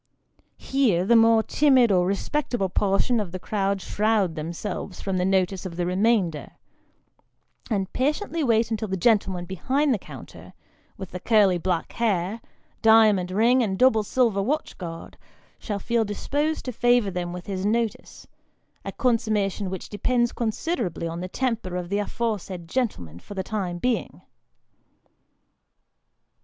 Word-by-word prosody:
Here, 230 -11 +1
the 235 - +4
more 225 -1 +5
timid 260 -6 +4
or 180 -2 +3
respectable 200 0 -1
portion 200 +6 +1
of 200 -5 -4
the 185 - -4
crowd 195 0 -2
shroud 210 -4 +1
themselves 170 +4 -5
from 195 -2 -2
the 180 - +1
notice 190 -1 +1
of 185 -3 -6
the 175 0 -1
remainder, 185 -4 0 1.2
and 195 -4 -2
patiently 305 +5 -1
wait 230 -3 +2
until 220 -1 -2
the 190 -1 -2
gentleman 190 -3 +1
behind 260 - 0
the 215 - -1
counter, - - -12 0.4
with 190 -3 -8
the 180 - -6
curly 200 -3 +3
black 175 -1 -2
hair, 215 -2 -1 0.4
diamond 215 -5 +5
ring, 230 +7 +3
and 195 -5 -1
double 250 -2 +4
silver 215 -2 +1
watch 295 +9 -2
guard, 165 -3 -8 0.4
shall 205 -3 -4
feel 230 +3 0
disposed 290 +9 -2
to 255 - -3
favour 240 -3 +2
them 175 -1 -3
with 180 0 -7
his 190 -2 -4
notice 220 +1 -2 0.6
a - - -5
consummation 215 -5 0
which 190 0 -6
depends 240 +3 0
considerably 225 - -2
on 165 +1 -5
the 185 +1 -5
temper 230 -6 -2
of 180 -1 -4
the 200 +1 0
afore 220 +1 -2
said 175 -2 -9
gentleman 90 - -3
for 205 - -11
the 190 - -2
time 185 -4 -3
being. 245 +6 -2
205 Hz, 150 wpm, -24 LUFS, 185-235 Hz, 1.2 s, more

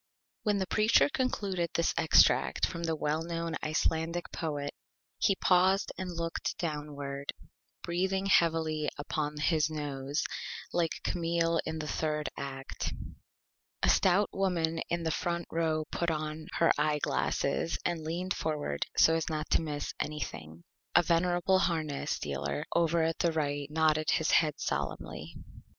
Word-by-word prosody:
When 210 -2 +1
the 190 - 0
Preacher 215 +8 +4
concluded 200 - -1
this 170 - +2
Extract - - +4
from 170 - -5
the 165 -1 0
Well 155 +1 0
Known 165 -1 -3
Icelandic 160 +2 -1
Poet 145 -3 -3 0.5
he 195 - +3
paused 190 +2 +3
and 185 -1 -4
looked 165 -1 -3
downward, 145 -3 -4 0.5
breathing 190 +3 0
heavily 160 -4 +2 0.2
through 150 -1 -1
his 155 -1 +2
Nose, 145 -1 -2 0.5
like 170 -2 0
Camille 170 -1 +1
in 160 - -3
the 155 -1 -4
Third 150 0 -1
Act. 135 -1 -5 0.9
A - - +4
Stout 195 +2 +4
Woman 170 -4 0
in 170 0 -1
the 160 - 0
Front 170 +2 -1
Row 160 -1 0
put 170 - 0
on 155 0 -3
her 165 - +4
Eye 150 0 +2
Glasses 145 +1 0
and 170 -2 -1
leaned 175 +4 -2
forward 150 - -2
so 160 - +6
as 165 -1 0
not 155 -1 -3
to - - +4
miss 150 -2 -4
Anything. 85 - -5 0.3
A 175 - +7
Venerable 175 +2 +2
Harness 155 -6 -1
Dealer 70 0 -3
over 170 -1 +3
at 165 -1 -1
the 170 - +2
Right 145 -2 -1
nodded 155 0 +2
his 160 - +2
Head 155 -1 +3
solemnly. 70 0 -4
160 Hz, 140 wpm, -31 LUFS, 150-170 Hz, 0.9 s, A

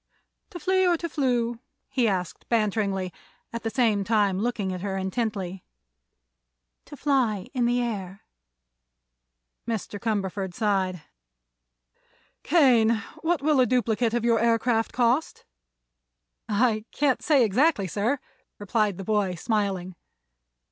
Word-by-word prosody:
"To 360 -5 -8
flee 375 +2 +2
or 345 -1 +3
to 335 - -4
flew?" 245 -6 0 0.3
he 255 -3 +1
asked, 185 -4 -3
banteringly, 200 -5 0 0.4
at 230 - -4
the 225 - -2
same 220 -4 +2
time 205 -3 +2
looking 210 -4 -1
at 180 - -5
her 195 -1 -3
intently. 190 -2 -3 1.2
"To 290 - -11
fly 250 -10 0
in 245 -3 +1
the 245 0 +1
air." 195 -4 -5 1.5
Mr. 215 -2 -3
Cumberford 195 -4 -2
sighed. 190 -6 0 1.4
"Kane, 240 -9 +4 0.3
what 330 -3 0
will 300 -2 +3
a 255 - +5
duplicate 230 -1 +1
of 235 -1 0
your 230 -1 +3
aircraft 230 0 +1
cost?" 250 +5 0 1.0
"I 215 0 +1
can't 285 -3 +1
say 290 -5 +4
exactly, 235 +1 +2
sir," 210 - 0 0.4
replied 205 -1 0
the 195 - -6
boy, 205 -2 0
smiling. 195 -2 -1
225 Hz, 120 wpm, -26 LUFS, 195-245 Hz, 1.5 s, a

